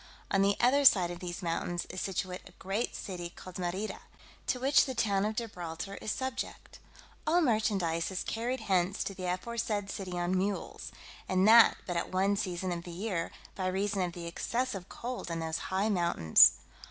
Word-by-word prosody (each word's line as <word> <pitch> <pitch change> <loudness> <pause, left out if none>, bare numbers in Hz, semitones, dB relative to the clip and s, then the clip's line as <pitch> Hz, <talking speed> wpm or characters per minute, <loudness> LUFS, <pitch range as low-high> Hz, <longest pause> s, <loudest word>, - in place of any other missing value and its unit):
On 195 - +3
the 200 0 +3
other 265 +4 +4
side 185 -9 +6
of 175 - -7
these 175 +1 -6
mountains 175 +1 -2
is 185 - -4
situate 185 -1 -3
a - - -20
great 195 +7 -3
city 175 -3 -5
called 185 +1 -10
Merida, 185 +4 -3 0.5
to 250 - 0
which 270 +3 +4
the 260 - -4
town 205 -3 +1
of 215 +1 -2
Gibraltar 190 -4 -5
is 215 - -2
subject. 260 +2 -5 0.5
All 335 +3 +4
merchandise 200 - +1
is 190 -1 -3
carried 245 +3 -2
hence 185 0 +1
to 195 - -4
the 185 -1 -6
aforesaid 205 +2 -2
city 185 -2 -5
on 175 +1 0
mules, 195 +2 -2 0.4
and 185 +1 +3
that 230 +1 +8
but 175 -2 -2
at 170 - -2
one 195 +2 +2
season 185 -1 -2
of 170 -1 -3
the 175 - -9
year, 175 -1 -3 0.2
by 185 -1 -2
reason 195 +1 0
of 175 -1 -1
the 170 -1 -7
excessive 200 +3 -3
cold 245 -6 -5
in 165 - -2
those 160 0 -2
high 190 +3 +1
mountains. 170 - +6
190 Hz, 185 wpm, -31 LUFS, 175-215 Hz, 0.5 s, that